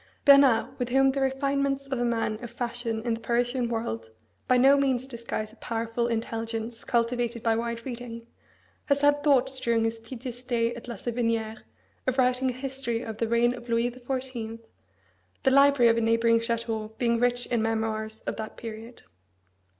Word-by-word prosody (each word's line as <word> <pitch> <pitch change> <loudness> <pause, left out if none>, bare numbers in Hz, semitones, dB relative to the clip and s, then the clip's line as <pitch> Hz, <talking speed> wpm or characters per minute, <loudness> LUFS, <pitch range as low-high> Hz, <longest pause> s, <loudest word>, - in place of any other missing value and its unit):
Bernard, 275 -5 +5
with 245 -1 -1
whom 270 +1 +4
the 275 0 -2
refinements 275 +1 0
of 270 -2 -3
a - - +1
man 230 -1 -1
of 240 - -5
fashion 235 -2 -3
in 235 -1 0
the 225 - -3
Parisian 240 +1 0
world 115 - -3 0.4
by 255 - +4
no 270 +3 +6
means 265 -2 +1
disguise 230 -3 -5
a - - -19
powerful 230 0 -2
intelligence 225 0 -3
cultivated 235 0 0
by 225 -1 +3
wide 235 0 -3
reading, 235 -2 -7 0.6
has 280 -1 +1
had 290 0 +3
thoughts 265 -2 +3
during 230 -2 +1
his 225 0 -1
tedious 245 +1 -7
stay 240 -2 0
at 235 0 -10
La 235 - -5
Savinière 230 -2 -2 0.5
of 260 0 +1
writing 255 0 +2
a - - -2
history 255 -2 -3
of 220 -2 -6
the 230 - 0
reign 235 +1 +3
of 240 -1 -10
Louis 230 +1 +2
the 250 +1 -12
Fourteenth, 245 -3 -4 0.8
the 265 - +4
library 275 -3 +6
of 230 - 0
a - - +2
neighbouring 230 0 +3
château 225 -2 -3
being 235 -1 +1
rich 245 0 +2
in 235 -2 0
memoirs 220 0 -2
of - - -4
that 220 -1 -6
period. 225 +1 -9
235 Hz, 180 wpm, -27 LUFS, 230-255 Hz, 0.8 s, no